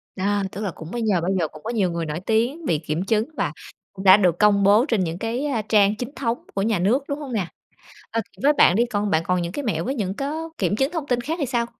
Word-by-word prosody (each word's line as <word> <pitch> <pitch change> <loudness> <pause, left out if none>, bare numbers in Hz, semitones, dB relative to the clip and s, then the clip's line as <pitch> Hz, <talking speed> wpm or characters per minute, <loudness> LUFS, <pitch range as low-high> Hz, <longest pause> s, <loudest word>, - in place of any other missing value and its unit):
Đó, 200 +1 0
tức 200 - -6
là 200 -4 -2
cũng 160 +1 -10
bây 240 - -3
giờ 205 -6 +1
bây 175 +3 -1
giờ 165 - +1
cũng 155 0 -14
có - - -4
nhiều 205 -7 +1
người 170 -1 -3
nổi 155 +1 -4
tiếng 235 - 0
bị 165 - +1
kiểm 155 +2 -3
chứng 215 +1 +1
và - - -1 0.4
cũng 190 - -8
đã 190 +1 +9
được 180 -4 +2
công 205 -1 +4
bố 205 +5 +5
trên 225 -10 +1
những 165 -1 -3
cái, 230 +7 -2
a, 265 -7 0
trang 210 -1 +3
chính 240 +3 -5
thống 235 -3 -1 0.2
của 195 - -1
nhà 215 -2 +1
nước, 225 +10 +2
đúng 285 +1 -2
hông 280 -4 -6
nè? 200 -6 -1 0.6
Ờ, 230 - 0 0.2
với 290 +2 +5
bạn 180 -10 +5
đi, 235 +3 +3
còn 210 -3 -2
bạn 160 -2 +2
còn 180 -1 +1
những 170 0 -3
cái 285 - -4
mẹo 170 - -1
với 270 - -2
những 195 -6 -2
có 305 +7 -4
kiểm 190 0 0
chứng 270 +6 0
thông 325 -5 -4
tin 245 -2 +1
khác 305 +7 -3
thì 290 - 0
sao? 240 -2 0
210 Hz, 285 wpm, -23 LUFS, 185-245 Hz, 0.6 s, đã